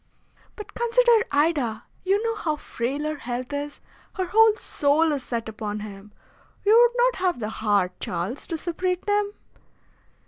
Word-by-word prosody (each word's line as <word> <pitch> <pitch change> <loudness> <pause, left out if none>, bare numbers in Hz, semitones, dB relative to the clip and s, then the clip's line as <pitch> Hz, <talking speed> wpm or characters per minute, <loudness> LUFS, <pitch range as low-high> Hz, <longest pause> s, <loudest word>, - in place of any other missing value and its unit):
"But 420 - -10
consider 475 -1 +3
Ida! 285 -7 +1 0.2
You 395 +3 +1
know 455 -1 -1
how 330 -8 -1
frail 275 0 -3
her 305 0 -2
health 250 +2 -5
is. 290 0 -4 0.4
Her 375 -3 -1
whole 440 +3 +5
soul 305 -4 +1
is 285 -2 -1
set 235 -3 -4
upon 210 -1 -5
him. 205 0 -10 0.5
You 425 +2 +6
would 480 +1 +5
not - - +3
have 365 -7 0
the 215 -2 -3
heart, 205 -4 0
Charles, 180 +10 -4
to 330 - -3
separate 360 +2 -2
them?" 410 0 +1
305 Hz, 160 wpm, -24 LUFS, -, 0.5 s, You